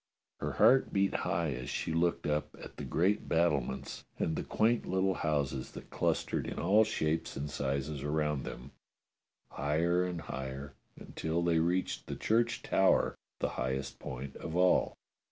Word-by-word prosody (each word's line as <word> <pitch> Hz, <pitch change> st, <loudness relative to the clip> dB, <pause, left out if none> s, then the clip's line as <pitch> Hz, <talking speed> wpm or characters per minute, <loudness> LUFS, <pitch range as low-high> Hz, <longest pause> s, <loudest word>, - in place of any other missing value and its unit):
Her -, -, -2 dB
heart 135 Hz, 0 st, +5 dB
beat 100 Hz, 0 st, +2 dB
high 85 Hz, -3 st, 0 dB
as 65 Hz, -1 st, -5 dB
she 80 Hz, -, -2 dB
looked 85 Hz, +1 st, +1 dB
up 75 Hz, 0 st, -1 dB
at -, -, -10 dB
the -, -, -5 dB
great 95 Hz, +5 st, +1 dB
battlements 70 Hz, -5 st, 0 dB
and 80 Hz, -, 0 dB
the -, -, -1 dB
quaint 115 Hz, +2 st, +1 dB
little 95 Hz, +1 st, +2 dB
houses 70 Hz, -6 st, -1 dB
that -, -, -10 dB
clustered -, -, 0 dB
in -, -, -5 dB
all 100 Hz, +6 st, +5 dB
shapes 80 Hz, -10 st, -1 dB
and 70 Hz, +2 st, -3 dB
sizes 70 Hz, 0 st, -2 dB
around 75 Hz, -1 st, 0 dB
them, 65 Hz, +3 st, -8 dB, 0.8 s
higher 85 Hz, +6 st, +1 dB
and 90 Hz, -2 st, -3 dB
higher, 65 Hz, +1 st, -6 dB, 0.3 s
until 80 Hz, +2 st, -2 dB
they 85 Hz, -1 st, +3 dB
reached 90 Hz, +3 st, 0 dB
the -, -, -4 dB
church 115 Hz, +1 st, +1 dB
tower, 95 Hz, 0 st, +3 dB, 0.2 s
the -, -, -1 dB
highest 65 Hz, +1 st, -3 dB
point 65 Hz, +2 st, -6 dB
of 80 Hz, -, -6 dB
all. 90 Hz, 0 st, +3 dB
80 Hz, 155 wpm, -32 LUFS, 70-90 Hz, 0.8 s, heart